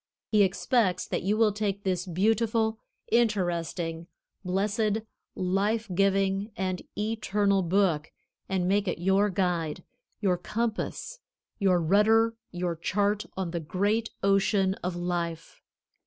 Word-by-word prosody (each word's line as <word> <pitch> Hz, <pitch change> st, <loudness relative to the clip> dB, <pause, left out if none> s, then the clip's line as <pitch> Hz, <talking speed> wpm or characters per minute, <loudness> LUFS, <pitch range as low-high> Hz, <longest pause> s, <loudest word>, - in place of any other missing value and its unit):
He 215 Hz, -2 st, +5 dB
expects 195 Hz, 0 st, +2 dB
that -, -, -2 dB
you 205 Hz, +4 st, 0 dB
will 220 Hz, -1 st, +4 dB
take 200 Hz, -1 st, -2 dB
this 185 Hz, -1 st, -1 dB
Beautiful, 220 Hz, +4 st, +1 dB, 0.3 s
Interesting, 175 Hz, -7 st, 0 dB, 0.4 s
Blessed, 205 Hz, +3 st, 0 dB, 0.3 s
Life 200 Hz, +4 st, 0 dB
giving 195 Hz, +2 st, +1 dB
and 185 Hz, -1 st, -2 dB, 0.2 s
Eternal 210 Hz, -2 st, +1 dB
book 175 Hz, -4 st, +1 dB, 0.4 s
and 185 Hz, -2 st, 0 dB
make 200 Hz, +1 st, +2 dB
it 180 Hz, -, -1 dB
your 195 Hz, +4 st, +2 dB
guide, 180 Hz, -3 st, -1 dB, 0.4 s
your 185 Hz, -4 st, +1 dB
compass, 235 Hz, -, -3 dB, 0.4 s
your 190 Hz, -3 st, +3 dB
rudder, 220 Hz, +6 st, +4 dB
your 175 Hz, -1 st, -2 dB
chart 205 Hz, +5 st, 0 dB
on 185 Hz, -3 st, -2 dB
the 170 Hz, -, -2 dB
great 205 Hz, +8 st, 0 dB
ocean 195 Hz, -1 st, +3 dB
of 180 Hz, 0 st, -2 dB
life. 170 Hz, -2 st, -3 dB
195 Hz, 120 wpm, -28 LUFS, 180-210 Hz, 0.4 s, He